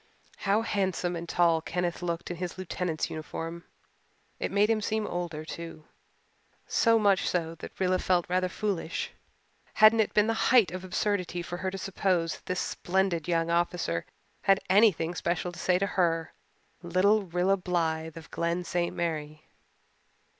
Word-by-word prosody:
How 205 +2 +1
handsome 185 -4 -1
and 170 0 -6
tall 170 -2 +3
Kenneth 175 +1 -2
looked 170 -1 -3
in 175 - -5
his 180 +1 -5
lieutenant's 180 -3 -3
uniform! 165 +2 -6 0.7
It - - -2
made 205 +1 +4
him 220 -1 +1
seem 215 +1 -1
older, 170 -3 -4
too 165 -1 -8 0.8
so 230 -1 +3
much 200 -3 +3
so 165 -2 -1
that - - -10
Rilla 185 -1 +2
felt 180 -2 +2
rather 185 +1 +1
foolish. 190 -4 -2 0.6
Hadn't 215 +1 +7
it 220 - +1
been 210 - +5
the 225 - +1 0.2
height 235 -9 +5
of 185 +1 -6
absurdity 180 -1 -1
for 175 +1 -5
her 190 +1 -2
to 195 - -6
suppose 185 -3 0
that - - -25
this 185 - -1
splendid 180 -3 0
young 165 -1 +1
officer 170 - 0 0.3
had 195 0 +4
anything 190 -5 +4
special 175 0 -1
to 175 - -11
say 180 -1 +2
to 195 - +1
her, 165 -4 0 0.5
little 185 +5 +3
Rilla 180 +1 +1
Blythe 165 -3 -2
of 165 0 -11
Glen 170 +1 -1
St. 175 0 -1
Mary? 155 -3 -3
180 Hz, 160 wpm, -28 LUFS, 170-195 Hz, 0.8 s, Hadn't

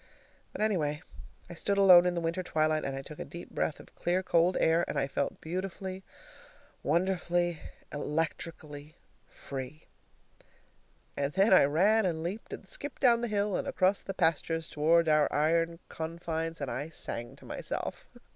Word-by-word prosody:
But, - - -6
anyway, 160 -7 0 0.4
I 175 - -9
stood 200 +4 -1
alone 180 -3 +8
in 180 - 0
the 170 - -1
winter 165 +2 -1
twilight, 155 -3 +1
and 135 - -3
I 135 - -5
took 150 +2 -11
a - - -3
deep 170 +5 -10
breath 155 - -1
of - - -15
clear 180 +2 0
cold 175 0 +3
air, 165 +1 +3
and - - -3
I - - +2
felt 140 +1 -2
beautifully, 185 +2 -5 0.8
wonderfully, 175 0 0 0.3
electrically 150 0 -4 0.3
free. 135 +2 -8 1.3
And 140 +1 -1
then 195 +2 +4
I 185 - +7
ran 195 +8 +3
and 160 -2 -2
leaped 195 +6 -5
and - - -8
skipped 295 - -6
down 235 -2 +5
the 240 - -1
hill 205 -2 0
and - - -2
across 185 +2 +2
the 195 - -6
pastures 165 -1 +1
toward 165 +2 +3
our 155 -1 +4
iron 165 +3 +1
confines, 165 0 -4
and 140 - -3
I 145 +4 -4
sang 120 -6 -4
to - - -17
myself. - - -5
165 Hz, 165 wpm, -30 LUFS, 155-185 Hz, 1.3 s, alone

